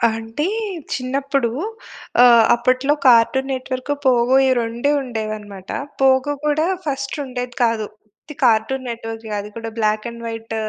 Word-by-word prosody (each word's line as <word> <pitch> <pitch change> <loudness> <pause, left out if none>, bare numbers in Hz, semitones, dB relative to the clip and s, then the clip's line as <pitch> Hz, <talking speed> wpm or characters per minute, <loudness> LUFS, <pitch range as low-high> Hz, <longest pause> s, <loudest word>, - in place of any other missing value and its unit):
అంటే 225 +6 -4 0.5
చిన్నప్పుడు 270 -1 -1 0.7
ఆహ్, 235 -2 +7
అప్పట్లో 255 +4 +1
'కార్టూన్ 255 +2 +4
నెట్ 260 0 -4
వర్క్', 255 +3 -3
పోగో 250 0 +4
ఈ - - +3
రెండే 235 +5 -1
ఉండేదన్నమాట. 215 -5 -6 0.3
'పోగో' 265 +2 +3
కూడా 300 +1 +2 0.2
ఫస్ట్ 275 -2 -3
ఉండేది 250 -1 -5
కాదు. 225 -2 +1 0.3
ఉత్తి 300 - -12
'కార్టూన్ 240 +4 +2
నెట్ 230 -1 -6
వర్క్' 225 0 -7
అది 205 +1 -7
కూడా 225 0 -5
బ్లాక్ 215 0 +1
అండ్ 235 0 -10
వైట్. 225 0 -6
240 Hz, 140 wpm, -20 LUFS, 225-265 Hz, 0.7 s, ఆహ్